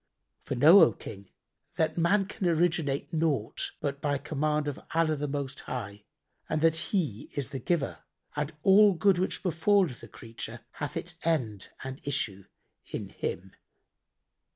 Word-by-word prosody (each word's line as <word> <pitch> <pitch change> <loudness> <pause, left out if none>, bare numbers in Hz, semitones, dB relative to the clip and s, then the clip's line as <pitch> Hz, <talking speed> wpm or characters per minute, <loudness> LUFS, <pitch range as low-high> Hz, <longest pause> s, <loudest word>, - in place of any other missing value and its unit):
For - - -4
know, 155 +10 +8
O 115 - +6
King, 100 0 -10 0.5
that 160 -1 +1
man 195 +4 +3
can 190 -1 -3
originate 160 -3 +1
naught 155 -9 0
but 140 -1 -3
by 145 -1 +1
command 150 +1 -1
of 145 - -3 0.2
Allah 165 -1 +3
the 145 0 -3
Most 140 -1 -4
High 105 -5 -6 0.4
and - - +1
that 165 0 +4
He 155 - -1
is 140 -5 -3
the 135 - -4
Giver 170 -4 -1 0.4
and 150 +1 -2
all 200 0 +7
good 185 +2 +3
which 185 - -1
befalleth 180 - +2
a - - -10
creature 115 0 -8 0.2
hath 145 - -3
its 175 0 -5
end 120 - -1
and 135 0 -6
issue 105 -9 -2 0.4
in - - -5
Him. 95 +2 -5
150 Hz, 155 wpm, -29 LUFS, 130-170 Hz, 0.5 s, know